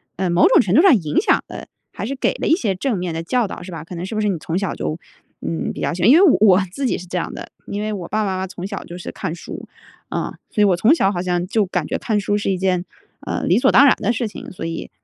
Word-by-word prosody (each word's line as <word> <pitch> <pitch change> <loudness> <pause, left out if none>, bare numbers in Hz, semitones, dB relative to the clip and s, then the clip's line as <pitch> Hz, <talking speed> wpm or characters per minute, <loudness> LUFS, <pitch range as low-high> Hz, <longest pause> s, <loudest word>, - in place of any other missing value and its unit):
呃， 185 -1 -1
某 175 +1 +5
种 - - +6
程 185 -1 -1
度 310 - +7
上 370 -9 +7
影 155 -5 0
响 - - +2
的， - - -8 0.2
还 - - -5
是 275 - -3
给 265 - 0
了 - - -3
一 320 - +5
些 215 - -1
正 220 +2 -1
面 175 -2 -3
的 165 - -3
教 240 +7 0
导 - - -8
是 180 +1 -9
吧？ 160 -1 -6
可 175 +2 -9
能 175 +2 -4
是 220 - -6
不 215 - 0
是 210 - +1
你 185 - -1
从 165 +3 -3
小 195 -2 -2
就， 155 - -3 0.4
嗯， 165 - -3
比 - - -7
较 - - -1
喜 175 - -5
欢 200 - +5
因 290 - +8
为 380 - +6 0.2
我 200 -2 +6
自 275 +6 -3
己 - - 0
是 180 - -9
这 180 - -3
样 170 - -3
的， - - -9 0.2
因 205 +1 -4
为 215 - -2
我 185 -5 -5
爸 215 0 -1
爸 - - -1
妈 185 - -2
妈 190 0 -3
从 180 -1 -7
小 200 -1 -5
就 175 - -9
是 180 - -7
看 160 - -4
书， - - -9 0.5
嗯， - - -2 0.2
所 210 - -1
以 - - +7
我 190 -3 +4
从 240 - +5
小 195 -10 +2
好 175 -3 -2
像 180 -1 -1
就 210 +2 +1
感 180 -4 -2
觉 - - -2
看 215 - -1
书 205 +1 0
是 200 - -1
一 185 - 0
件， 185 -1 0 0.4
呃， - - -3
理 180 - +3
所 - - +4
当 280 - +7
然 270 - +6
的 - - +1
事 235 0 -2
情， 210 - -9
所 180 - -8
以， 165 0 -5
190 Hz, 335 characters per minute, -20 LUFS, 175-215 Hz, 0.5 s, 因